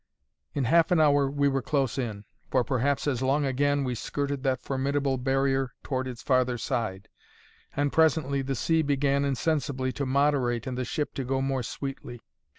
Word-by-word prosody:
In 140 - 0
half 165 +7 +4
an 180 - +3
hour 145 -3 +4
we 140 0 +1
were 135 -1 +1
close 135 -1 0
in; 105 -5 -4 0.2
for 130 -2 +2
perhaps 135 +3 0
as 130 -4 0
long 140 +2 +2
again, 145 +2 +1
we 125 -2 -1
skirted 140 +3 -3
that 130 -2 0
formidable 135 0 0
barrier 135 0 0
toward 130 -2 -2
its 125 -1 -7
farther 130 -2 +2
side; 100 -4 -3 0.7
and 145 0 0
presently 155 -4 +3
the 135 0 -2
sea 160 +6 +2
began 140 -1 +1
insensibly 140 -1 0
to 140 +1 -3
moderate 130 -4 +1
and 130 -2 -3
the 125 0 -2
ship 150 +5 -3
to 135 - -3
go 130 +1 -1
more 135 -1 0
sweetly. 130 -1 -6
135 Hz, 175 wpm, -27 LUFS, 130-145 Hz, 0.7 s, half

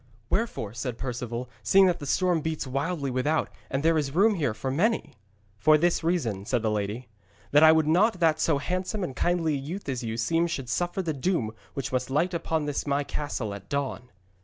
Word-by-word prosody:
'Wherefore,' 195 - -1
said 120 0 -4
Perceval, 125 -1 -4
'seeing 190 - +5
that 180 -2 +2
the 145 - -6
storm 180 +1 +2
beats 160 -1 -3
wildly 140 +2 -2
without 135 +5 0 0.2
and 135 +2 -1
there 165 0 +4
is 140 -1 -3
room 210 +4 +5
here 145 - -1
for 130 +4 -3
many?' 215 - 0 0.5
'For 155 +8 +6
this 170 +1 +1
reason,' 125 - 0
said 120 +2 -1
the 110 - +1
lady, 105 +4 -3 0.4
'that 145 - +6
I 160 0 +9
would 160 -1 +3
not 185 +6 +3
that 160 -2 +3
so 155 -2 +2
handsome 185 +6 -2
and 135 -7 -4
kindly 175 -3 +1
a - - 0
youth 160 +8 -6
as 130 -3 -2
you 115 0 -3
seem 165 +9 +1
should 135 -7 -4
suffer 175 +6 -1
the 160 -3 -1
doom 140 - -1 0.2
which 135 - -3
must 130 0 -1
light 165 +7 +1
upon 160 -2 -1
this 145 0 -2
my 140 +1 +1
castle 140 -8 -4
at 100 -1 -10
dawn.' 140 -3 -3
145 Hz, 210 wpm, -27 LUFS, 125-170 Hz, 0.5 s, I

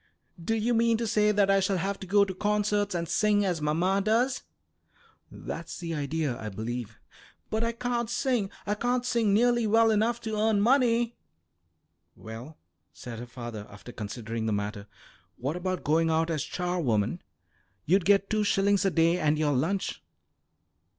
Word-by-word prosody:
Do 225 +6 0
you 225 +2 +1
mean 230 0 +3
to 230 - -2
say 210 -1 +3
that 200 -1 +3
I 195 - +4
shall 190 0 +1
have 195 +3 -2
to 190 - -8
go 200 +2 +4
to 190 - -5
concerts 205 0 0
and 170 -1 -2
sing 205 +1 +2
as 175 -4 -1
mamma 175 +6 +1
does?" 240 +5 +1 0.9
"That's - - -7
the 170 -1 -4
idea, 150 -3 -2
I 110 - -4
believe." 115 +2 -5 0.5
"But 220 +1 0
I 230 - +1
can't 240 -1 -2
sing. 245 -4 0 0.2
I 205 - 0
can't 245 +3 -1
sing 230 -4 +1
nearly 240 +2 +3
well 225 +1 +4
enough 225 +3 +1
to 220 -2 -3
earn 215 0 +2
money." 235 0 +3 1.0
"Well," 115 +8 -10 0.3
said 115 -2 -8
her 120 - -7
father, 120 -4 -7
after 105 +4 -11
considering 110 +1 -5
the 110 - +1
matter, 100 0 -4 0.5
"what 140 +6 -3
about 185 +1 -3
going 165 +2 +2
out 160 +1 +1
as 155 -3 -1
charwoman? 170 - -1 0.6
You'd 185 +4 +3
get 200 +1 +3
two 215 -1 +1
shillings 200 0 +2
a 195 - +3
day 170 0 +2
and 150 0 +2
your 150 -1 +1
lunch." 170 +9 -1
195 Hz, 170 wpm, -28 LUFS, 150-220 Hz, 1.0 s, I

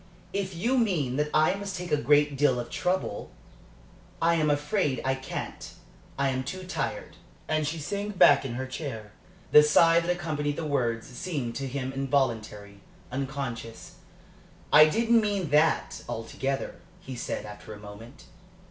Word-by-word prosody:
"If 195 -2 -2
you 240 +9 +1
mean 155 - 0
that 150 0 0
I 155 - +4
must 200 -1 -5
take 180 -2 -6
a - - +5
great 145 0 +3
deal 135 -3 +3
of 120 - -6
trouble, 180 - -2 0.9
I 170 +1 +3
am 155 -2 +2
afraid 145 0 0
I 135 - +2
can't. 130 0 -6 0.5
I 140 0 +2
am 130 0 -1
too 185 +8 -6
tired." 475 - -4 0.3
And 155 -1 0
she 160 +3 -2
sank 200 +6 -4
back - - +7
in 125 -3 -4
her 130 +1 -3
chair. 130 -6 -6 0.4
The 150 - +10
sigh 165 +3 +5
that 170 +1 -3
accompanied 155 -4 -1
the 160 - -4
words 120 -6 0
seemed 130 -3 -4
to 135 - -3
him 130 0 -4
involuntary, 115 -7 -1 0.3
unconscious. 130 -4 -5 0.8
"I 150 +1 +10
didn't 230 +7 +3
mean 200 -7 -1
that 150 +2 +2
altogether," 135 +4 -3 0.2
he 130 -7 -8
said, 120 - -4
after 105 -1 -10
a 105 - -8
moment. 105 +3 -12
145 Hz, 155 wpm, -27 LUFS, 130-170 Hz, 0.9 s, The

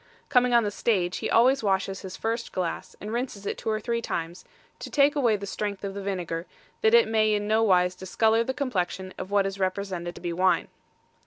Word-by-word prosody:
Coming 250 -3 +4
on 235 - +5
the 205 - -1
stage, 190 -5 0
he - - -3
always 260 +4 +4
washes 195 -1 0
his 190 -1 -8
first 230 +1 -3
glass, 180 -3 -4
and 210 +2 -6
rinses 235 -5 -3
it - - -2
two - - -4
or 215 0 0
three 235 +1 -2
times, 170 -4 -4 0.4
to - - -7
take 285 0 +3
away 240 -7 +3
the 200 0 -5
strength 200 0 -4
of 195 -1 -3
the 200 - -5
vinegar, 180 -3 -3 0.3
that 445 +1 +5
it 470 - +6
may 215 -1 +2
in 205 0 -2
no 220 +1 +3
wise 180 -4 +3
discolour 220 +5 +1
the 260 - -2
complexion 190 -8 -2
of 185 - -5
what 200 -1 +2
is 195 0 -4
represented 185 -2 -2
to - - -11
be 175 -1 -3
wine. 185 +2 +2
200 Hz, 220 wpm, -26 LUFS, 185-230 Hz, 0.4 s, it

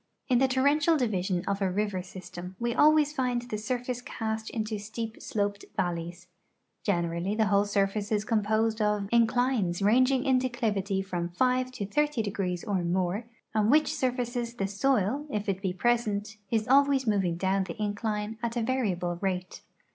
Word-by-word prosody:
In 245 -2 +4
the 265 - +4
torrential 285 +5 +3
division 190 -8 0
of 200 0 -1
a 195 - +2
river 200 0 -1
system 180 0 -9
we 235 +2 -1
always 300 +2 +4
find 250 -4 0
the 240 -3 -4
surface 245 +2 -3
cast 220 -2 -4
into 215 -2 -3
steep 220 +2 -6
sloped 205 -1 -2
valle3's. 175 0 -2 0.6
Generally 170 +1 0
the 220 0 +3
whole 200 0 +3
surface 200 +1 0
is 210 -1 +1
composed 220 0 +1
of 210 -1 +1
inclines 235 -5 +2
ranging 255 +6 +3
in 260 -2 +4
declivitv' 210 -6 -1
from 175 -2 -3
five 255 +7 +1
to 215 -6 -4
thirty 295 +2 0
degrees 185 -3 -2
or 200 -5 -1
more, 180 +5 0 0.3
on 215 0 +2
which 300 +2 +4
surfaces 245 -4 -2
the 195 - -1
soil, 245 +5 +1
if 210 -5 -3
it 195 -1 -1
be 190 -2 0
present, 220 0 0
is 220 -2 +1
alwavs 275 +1 +4
moving 190 -6 +1
down 190 +1 +1
the 170 +1 -8
incline 210 +1 -2
at 235 0 -2
a 235 - +1
variable 190 -9 -1
rate. 185 -2 -3
215 Hz, 165 wpm, -28 LUFS, 195-245 Hz, 0.6 s, In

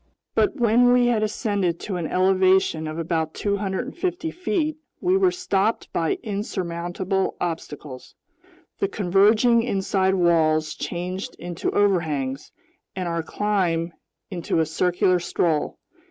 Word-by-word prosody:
But 390 - +2
when 240 -1 +4
we 245 0 +4
had 235 -3 +2
ascended 205 -5 -1
to 195 - -4
an 170 -3 -2
elevation 185 -3 +2
of 155 +1 -5
about 165 -1 -2
250 250 - -2
feet, 335 -4 -1 0.2
we 365 +1 +2
were 385 -1 +4
stopped 225 - -1
by 165 -1 0
insurmountable 190 -2 -2
obstacles. 150 -5 -6 0.6
The 395 - +1
converging 215 - +3
inside 190 -4 +1
walls 155 -3 +2
changed 180 +2 -5
into 175 0 -4
overhangs, 155 -9 0 0.4
and 185 -2 -3
our 170 -1 -1
climb 175 -3 -1 0.4
into 175 -2 -1
a 160 - +3
circular 180 +3 +1
stroll. 165 -3 0
190 Hz, 120 wpm, -23 LUFS, 170-215 Hz, 0.6 s, when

